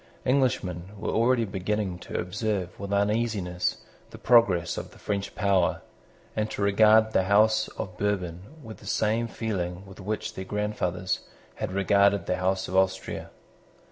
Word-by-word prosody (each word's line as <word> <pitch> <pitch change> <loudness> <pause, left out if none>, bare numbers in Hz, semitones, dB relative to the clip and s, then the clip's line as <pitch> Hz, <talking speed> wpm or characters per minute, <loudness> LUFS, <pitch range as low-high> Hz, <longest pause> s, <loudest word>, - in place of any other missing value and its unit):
Englishmen 100 -9 0
were 100 - -3
already 115 +1 +3
beginning 95 -1 -2
to - - -5
observe 95 0 -2
with 100 0 -5
uneasiness 100 -3 0 0.3
the - - -11
progress 95 -9 +4
of - - -6
the - - -17
French 100 -1 -3
power, 95 -3 +2 0.5
and 110 0 0
to 100 - -3
regard 110 +2 +5
the 95 - +2
House 110 +2 +4
of 90 -1 -5
Bourbon 90 -4 -1 0.2
with 110 -2 -9
the - - -13
same 110 +2 +1
feeling 95 -5 -3
with 95 +1 -13
which 105 +2 -3
their 95 - -5
grandfathers 95 -3 -1 0.4
had - - -3
regarded 100 +1 +3
the 90 - 0
House 95 +1 0
of 95 - -5
Austria. 95 0 0
100 Hz, 150 wpm, -27 LUFS, 95-110 Hz, 0.5 s, regard